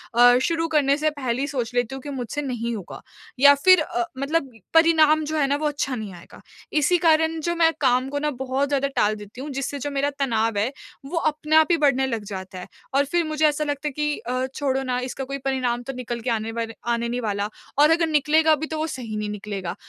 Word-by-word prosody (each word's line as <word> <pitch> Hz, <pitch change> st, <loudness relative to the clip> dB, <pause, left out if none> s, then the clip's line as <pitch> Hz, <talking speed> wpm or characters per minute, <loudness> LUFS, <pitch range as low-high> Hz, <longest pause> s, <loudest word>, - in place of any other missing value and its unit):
अ, 245 Hz, +1 st, +7 dB
शुरू 330 Hz, +2 st, 0 dB
करने 285 Hz, -3 st, +2 dB
से 310 Hz, +1 st, +1 dB
पहले 260 Hz, -4 st, -3 dB
ही 280 Hz, -, -1 dB
सोच 250 Hz, -4 st, -3 dB
लेती 245 Hz, +2 st, 0 dB
हूँ 270 Hz, -, -7 dB
कि 290 Hz, -, -8 dB
मुझसे 265 Hz, +1 st, -4 dB
नहीं 235 Hz, -4 st, -3 dB
होगा। 200 Hz, -5 st, -8 dB, 0.4 s
या 285 Hz, +1 st, +8 dB
फिर 365 Hz, +3 st, +5 dB
अ, 355 Hz, +2 st, -2 dB
मतलब 275 Hz, -1 st, -1 dB, 0.3 s
परिणाम 310 Hz, -2 st, +4 dB
जो 310 Hz, +1 st, -3 dB
है 285 Hz, -, +3 dB
ना 280 Hz, -, +1 dB
वो 305 Hz, -, +1 dB
अच्छा 285 Hz, -3 st, -2 dB
नहीं 210 Hz, -5 st, -6 dB
आएगा। 170 Hz, -, -14 dB, 0.3 s
इसी 305 Hz, +4 st, +3 dB
कारण 320 Hz, -1 st, +2 dB
जो 345 Hz, -, +1 dB
मैं 330 Hz, -1 st, +4 dB
काम 255 Hz, 0 st, +3 dB
को 285 Hz, -, -2 dB
ना 300 Hz, +1 st, 0 dB
बहुत 265 Hz, +2 st, -1 dB
ज़्यादा 280 Hz, -1 st, 0 dB
टाल 210 Hz, +1 st, +2 dB
देती 210 Hz, +4 st, -10 dB
हूँ 295 Hz, -, -6 dB
जिससे 275 Hz, +1 st, -3 dB
जो 290 Hz, -, -3 dB
मेरा 280 Hz, +1 st, 0 dB
तनाव 225 Hz, -5 st, 0 dB
है 220 Hz, +6 st, +1 dB, 0.3 s
वो 330 Hz, +4 st, -4 dB
अपने 305 Hz, 0 st, 0 dB
आप 315 Hz, 0 st, +6 dB
ही 335 Hz, -, +4 dB
बढ़ने 265 Hz, -3 st, +2 dB
लग 230 Hz, -4 st, -3 dB
जाता 190 Hz, -2 st, -7 dB
है 180 Hz, -, -9 dB, 0.3 s
और 280 Hz, +1 st, +3 dB
फिर 345 Hz, -1 st, +2 dB
मुझे 310 Hz, 0 st, +1 dB
ऐसा 300 Hz, 0 st, 0 dB
लगता 290 Hz, 0 st, -3 dB
है -, -, -2 dB
कि 300 Hz, +1 st, -1 dB
अ, 255 Hz, +2 st, -2 dB
छोड़ो 270 Hz, -2 st, -1 dB
ना 250 Hz, -1 st, -1 dB
इसका 255 Hz, +1 st, -5 dB
कोई 275 Hz, +1 st, -5 dB
परिणाम 250 Hz, -2 st, -1 dB
तो 270 Hz, -, -6 dB
निकल 240 Hz, -1 st, -5 dB
के 245 Hz, -, -3 dB
आने 225 Hz, -1 st, -1 dB
वाले 225 Hz, 0 st, -4 dB, 0.2 s
आने 235 Hz, 0 st, -2 dB
नहीं 245 Hz, +1 st, -2 dB
वाला 205 Hz, -1 st, -2 dB, 0.3 s
और 300 Hz, +2 st, +6 dB
अगर 330 Hz, 0 st, +3 dB
निकलेगा 310 Hz, +1 st, +3 dB
भी 310 Hz, +2 st, -5 dB
तो 315 Hz, -, -4 dB
वो 315 Hz, +1 st, -1 dB
सही 240 Hz, -7 st, -6 dB
नहीं 210 Hz, 0 st, -3 dB
निकलेगा। 200 Hz, -3 st, -5 dB
275 Hz, 240 wpm, -23 LUFS, 240-305 Hz, 0.4 s, या